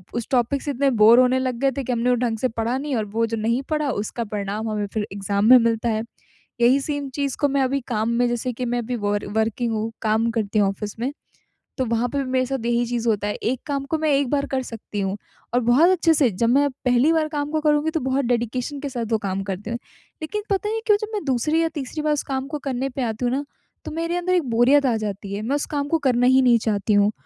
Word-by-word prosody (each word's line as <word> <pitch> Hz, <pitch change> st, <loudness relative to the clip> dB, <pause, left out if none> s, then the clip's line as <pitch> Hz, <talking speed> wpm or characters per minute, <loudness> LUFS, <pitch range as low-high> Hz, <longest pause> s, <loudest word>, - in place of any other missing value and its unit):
उस 235 Hz, -, -3 dB
टॉपिक 255 Hz, +2 st, +1 dB
से 290 Hz, -, -3 dB
इतने 275 Hz, +1 st, +1 dB
बोर 230 Hz, +3 st, +8 dB
होने 255 Hz, +1 st, +4 dB
लग 255 Hz, -2 st, -1 dB
गए 275 Hz, 0 st, +2 dB
थे 275 Hz, -, -1 dB
कि 255 Hz, -, -3 dB
हमने 240 Hz, +1 st, +1 dB
वो 250 Hz, -, +4 dB
ढंग 235 Hz, -2 st, -1 dB
से 255 Hz, -, +1 dB
पढ़ा 230 Hz, +2 st, -2 dB
नहीं 285 Hz, 0 st, -3 dB
और 220 Hz, -2 st, -1 dB
वो 230 Hz, -, +2 dB
जो 225 Hz, 0 st, -3 dB
नहीं 230 Hz, +4 st, 0 dB
पढ़ा 300 Hz, -2 st, 0 dB
उसका 215 Hz, +2 st, -3 dB
परिणाम 205 Hz, +2 st, -3 dB
हमें 210 Hz, -1 st, -1 dB
फ़िर 215 Hz, -2 st, -2 dB
एग्ज़ाम 200 Hz, +1 st, -1 dB
में 255 Hz, -, +10 dB
मिलता 230 Hz, -1 st, +1 dB
है। 220 Hz, 0 st, -1 dB, 0.6 s
यही 250 Hz, +4 st, +5 dB
सेम 285 Hz, -1 st, -3 dB
चीज़ 280 Hz, -2 st, -2 dB
को 290 Hz, -, +3 dB
मैं 275 Hz, 0 st, +1 dB
अभी 270 Hz, +1 st, 0 dB
काम 220 Hz, -1 st, 0 dB
में 245 Hz, -, +3 dB
जैसे 240 Hz, +1 st, -2 dB
कि 250 Hz, +2 st, -4 dB
मैं 245 Hz, 0 st, -1 dB
अभी 240 Hz, +1 st, -3 dB
वर 205 Hz, -1 st, -1 dB
वर्किंग 225 Hz, +2 st, 0 dB
हूँ, 220 Hz, +1 st, -2 dB
काम 220 Hz, +1 st, +1 dB
करती 220 Hz, -2 st, -1 dB
हूँ 200 Hz, -2 st, +4 dB
ऑफिस 205 Hz, +2 st, -5 dB
में। 260 Hz, +4 st, -1 dB, 0.7 s
तो 260 Hz, -, 0 dB
वहाँ 230 Hz, +1 st, 0 dB
पे 280 Hz, -, -3 dB
भी -, -, -6 dB
मेरे 255 Hz, 0 st, +2 dB
साथ 260 Hz, -3 st, -3 dB
यही 240 Hz, 0 st, +1 dB
चीज़ 235 Hz, 0 st, -2 dB
होता 210 Hz, -2 st, +1 dB
है, 205 Hz, -, -1 dB
एक 245 Hz, +2 st, -2 dB
काम 280 Hz, -2 st, -2 dB
को 320 Hz, -, -1 dB
मैं 310 Hz, -1 st, 0 dB
एक 275 Hz, -2 st, +1 dB
बार 280 Hz, 0 st, +1 dB
कर 265 Hz, -1 st, -1 dB
सकती 220 Hz, -3 st, -7 dB
हूँ 195 Hz, 0 st, -1 dB, 0.4 s
और 245 Hz, -, +4 dB
बहुत 300 Hz, +9 st, +6 dB
अच्छे 340 Hz, -3 st, +3 dB
से 290 Hz, -5 st, +3 dB
जब 230 Hz, +5 st, 0 dB
मैं 285 Hz, +3 st, +4 dB, 0.2 s
पहली 250 Hz, +5 st, +4 dB
बार 315 Hz, -1 st, +1 dB
काम 295 Hz, -1 st, -3 dB
को 310 Hz, 0 st, 0 dB
करूँगी 300 Hz, +1 st, +2 dB
तो 320 Hz, -, -1 dB
बहुत 265 Hz, 0 st, 0 dB
डेडिकेशन 245 Hz, +3 st, -1 dB
के 285 Hz, 0 st, -4 dB
साथ 240 Hz, -3 st, -3 dB
वो 225 Hz, -, +3 dB
काम 195 Hz, -2 st, -3 dB
करती 195 Hz, +2 st, -5 dB
हूँ। 235 Hz, -, -2 dB, 0.4 s
लेकिन 420 Hz, +7 st, -3 dB
पता 400 Hz, +1 st, 0 dB
नहीं 445 Hz, +1 st, -2 dB
क्यों 420 Hz, -3 st, +5 dB
जब 430 Hz, -, -3 dB
मैं 420 Hz, -, -2 dB
दूसरी 290 Hz, +5 st, +1 dB
या 330 Hz, -, +1 dB
तीसरी 290 Hz, +2 st, -4 dB
बार 305 Hz, 0 st, +2 dB
उस 295 Hz, -, -1 dB
काम 265 Hz, 0 st, -3 dB
को 295 Hz, +1 st, -4 dB
करने 265 Hz, 0 st, -1 dB
पे 270 Hz, +1 st, -5 dB
आती 230 Hz, +1 st, -2 dB
हूँ 245 Hz, -, +1 dB
ना 280 Hz, +2 st, -1 dB, 0.4 s
तो -, -, -5 dB
मेरे 335 Hz, +2 st, -2 dB
अंदर 360 Hz, +1 st, 0 dB
एक 355 Hz, -3 st, +3 dB
बोरियत 255 Hz, +5 st, +4 dB
आ 245 Hz, -3 st, +2 dB
जाती 205 Hz, -2 st, -5 dB
है। 200 Hz, -, -3 dB
मैं 255 Hz, +6 st, -1 dB
उस 290 Hz, -, -1 dB
काम 285 Hz, 0 st, -1 dB
को 330 Hz, -, +2 dB
करना 245 Hz, -1 st, +3 dB
ही 260 Hz, +1 st, +5 dB
नहीं 245 Hz, -2 st, +5 dB
चाहती 210 Hz, 0 st, +1 dB
हूँ 205 Hz, +1 st, +4 dB
245 Hz, 270 wpm, -23 LUFS, 225-280 Hz, 0.7 s, में